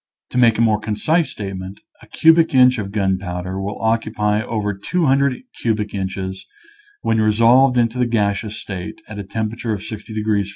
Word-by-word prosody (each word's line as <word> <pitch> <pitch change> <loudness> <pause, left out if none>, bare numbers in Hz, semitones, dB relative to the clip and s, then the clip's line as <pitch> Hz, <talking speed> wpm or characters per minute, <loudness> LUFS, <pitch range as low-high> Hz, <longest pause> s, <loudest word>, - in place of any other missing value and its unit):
To 125 - 0
make 115 -3 +5
a - - +1
more 110 -2 +3
concise 110 +11 0
statement, 95 -1 -7 0.2
a - - -16
cubic 160 -2 +4
inch 125 -1 +5
of 100 -2 -5
gunpowder 95 -2 -2
will 100 +1 -5
occupy 110 -2 0
over 105 -2 -2
200 140 - +1 0.2
cubic 105 -2 -1
inches 95 -1 -4 0.6
when 110 -1 +2
re 110 0 +3
solved 125 +4 +5
into 120 +1 +1
the 125 - +2
gaseous 105 -1 -1
state, 100 -1 -7
at 105 -1 -8
a - - -4
temperature 110 +3 -3
of 100 -1 -5
60 110 0 -8
degrees 105 -2 0
F. - - -9
110 Hz, 175 wpm, -20 LUFS, 100-115 Hz, 0.6 s, make